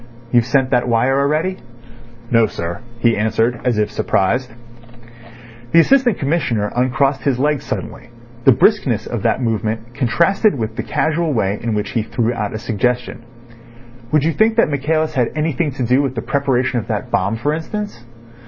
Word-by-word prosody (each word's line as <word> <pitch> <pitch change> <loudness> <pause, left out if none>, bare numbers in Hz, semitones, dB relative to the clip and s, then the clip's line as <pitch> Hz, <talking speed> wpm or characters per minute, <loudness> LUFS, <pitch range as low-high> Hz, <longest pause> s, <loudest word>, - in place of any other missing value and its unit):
"You've 120 -1 +3
sent 130 +1 +1
that 125 -1 +2
wire 125 +3 +2
already?" 155 +7 0 0.7
"No, 115 -2 +4
sir," 85 -4 -5 0.2
he 115 -1 +2
answered, 110 +3 0
as 125 -4 +1
if 105 0 0
surprised. 115 +4 0 1.2
The 165 - +7
Assistant 250 +3 +4
Commissioner 135 -9 -1
uncrossed 135 +2 +1
his 135 -3 0
legs 145 +1 0
suddenly. 120 - -6 0.4
The 135 - +8
briskness 125 - +2
of 120 -4 -4
that 115 +4 0
movement 115 +1 -2
contrasted 170 - +2
with 110 -2 -4
the - - -2
casual 160 0 0
way 100 -3 0
in 115 -2 -2
which 105 -1 -2
he 115 - 0
threw 115 +2 -1
out 105 -3 -3
a - - -2
suggestion. 120 +2 -2 0.9
"Would 150 -2 +3
you 165 +1 +1
think 220 +4 +2
that 230 -9 +3
Michaelis 155 +3 0
had 125 -3 +1
anything 155 0 0
to 130 - -3
do 125 +3 +3
with 135 -2 -2
the 115 - -3
preparation 130 -3 0
of 105 - -7
that - - -3
bomb, 100 +4 +1
for 145 +7 -1
instance?" 205 - -5
125 Hz, 170 wpm, -18 LUFS, 115-150 Hz, 1.2 s, The